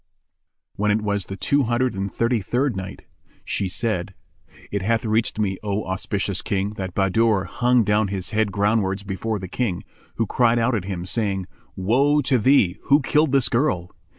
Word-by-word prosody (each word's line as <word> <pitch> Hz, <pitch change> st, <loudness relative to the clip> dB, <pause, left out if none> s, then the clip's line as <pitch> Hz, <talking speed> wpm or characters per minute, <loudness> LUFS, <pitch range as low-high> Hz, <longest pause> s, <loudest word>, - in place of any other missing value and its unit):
When 105 Hz, +1 st, +1 dB
it 105 Hz, +1 st, +1 dB
was 100 Hz, -2 st, -1 dB
the 95 Hz, -, -6 dB
Two 140 Hz, +9 st, +2 dB
Hundred 120 Hz, +2 st, +1 dB
and 95 Hz, 0 st, -3 dB
Thirty 115 Hz, -1 st, 0 dB
third 125 Hz, +5 st, 0 dB
Night, 95 Hz, 0 st, -7 dB, 0.4 s
She 95 Hz, -, -2 dB
said, 100 Hz, -3 st, -2 dB, 0.6 s
It 100 Hz, -, -1 dB
hath 115 Hz, +3 st, 0 dB
reached 110 Hz, +1 st, 0 dB
me, 100 Hz, -3 st, -1 dB
O 105 Hz, 0 st, -2 dB
auspicious 95 Hz, +1 st, -2 dB
King, 100 Hz, 0 st, -1 dB
that 95 Hz, -4 st, -6 dB
Bahadur 100 Hz, +1 st, +2 dB
hung 120 Hz, +5 st, +2 dB
down 105 Hz, 0 st, +2 dB
his 95 Hz, -2 st, -4 dB
head 110 Hz, -1 st, +1 dB
groundwards 100 Hz, -1 st, +1 dB
before 105 Hz, +3 st, -2 dB
the 95 Hz, -1 st, -6 dB
King, 95 Hz, -3 st, -2 dB, 0.3 s
who 115 Hz, -, 0 dB
cried 120 Hz, +2 st, +2 dB
out 120 Hz, +2 st, +2 dB
at 105 Hz, -5 st, -1 dB
him, 90 Hz, -3 st, -4 dB
saying, 100 Hz, -3 st, -1 dB, 0.3 s
"Woe 135 Hz, +10 st, +2 dB
to 130 Hz, -1 st, +2 dB
thee! 105 Hz, -7 st, +3 dB
Who 140 Hz, +1 st, +5 dB
killed 150 Hz, +1 st, +2 dB
this 135 Hz, -4 st, +3 dB
girl?" 110 Hz, -, 0 dB
105 Hz, 180 wpm, -23 LUFS, 95-115 Hz, 0.6 s, Who